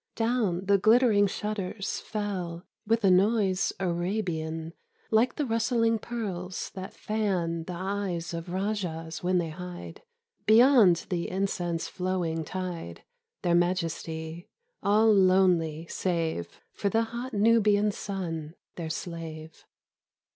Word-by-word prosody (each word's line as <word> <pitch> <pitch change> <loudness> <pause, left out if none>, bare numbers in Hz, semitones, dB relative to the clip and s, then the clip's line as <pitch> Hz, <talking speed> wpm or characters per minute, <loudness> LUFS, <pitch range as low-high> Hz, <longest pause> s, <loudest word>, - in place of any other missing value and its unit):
Down 225 -6 0
the 200 0 +4
glittering 215 -1 +5
shutters 200 0 -3
fell 185 -5 -4 0.2
With 225 0 +2
a 195 - +5
noise 195 0 +3
Arabian 170 -3 -2 0.4
Like 230 +3 +3
the 295 - -1
rustling 230 -1 +1
pearls 190 -6 -4
that 190 0 -7
fan 180 -6 -1
The 180 - -5
eyes 185 -3 -3
of 165 +1 -5
rajahs 175 -5 -3
when 180 +1 +2
they 170 -2 0
hide 180 +1 -8 0.5
Beyond 220 -6 +6
the 175 -2 -1
incense 175 -3 -1
flowing 180 -3 -2
tide 175 - -5 0.4
Their 175 - +2
majesty, 170 -2 -1 0.3
all 215 +2 +4
lonely 180 -5 +3
save 165 - -2
For 200 - -1
the 225 +3 +2
hot 235 +2 -5
Nubian 210 -1 +4
sun, 170 -6 -5 0.2
their 165 -2 -4
slave. 160 -1 -7
185 Hz, 115 wpm, -28 LUFS, 170-210 Hz, 0.5 s, Beyond